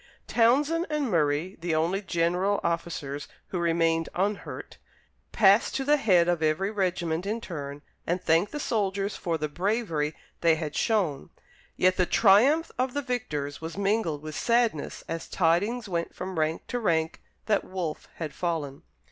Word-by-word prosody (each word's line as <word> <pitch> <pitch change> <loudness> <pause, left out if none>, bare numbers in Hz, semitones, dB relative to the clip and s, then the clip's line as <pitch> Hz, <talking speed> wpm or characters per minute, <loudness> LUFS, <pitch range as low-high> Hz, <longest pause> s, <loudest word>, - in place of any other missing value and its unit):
Townshend 290 +9 +3
and 295 -6 -1
Murray, 155 +3 +1
the 170 -2 0
only 170 +5 +1
general 180 +2 +1
officers 155 -4 -3 0.2
who 180 - -2
remained 165 -1 +1
unhurt, 200 +3 -3 0.5
passed 205 0 +4
to 270 - 0
the 295 +2 +4
head 185 -9 +4
of 175 -2 +1
every 160 +6 +1
regiment 180 -3 -1
in 220 +3 -1
turn 145 -8 -7 0.2
and 175 +2 +1
thanked 170 +4 +2
the 295 - -4
soldiers 200 -5 -1
for 170 -2 -2
the 155 -1 -2
bravery 170 -3 -1 0.2
they 165 -1 +4
had 155 -2 -5
shown; 185 - 0 0.5
yet 185 0 +3
the 180 -2 +2
triumph 255 +11 +4
of 255 0 0
the 285 - -1
victors 150 - -3
was 160 +2 -6
mingled 195 -7 0
with 155 0 -6
sadness 230 -5 0
as 165 0 -4
tidings 205 +7 +1
went 170 -3 -3
from 185 -3 -4
rank 155 +1 -1
to 245 - -3
rank 160 -6 0 0.2
that 210 -2 +2
Wolfe 180 -5 -5
had 155 -3 -5
fallen. 155 -6 -3
180 Hz, 155 wpm, -27 LUFS, 160-210 Hz, 0.5 s, passed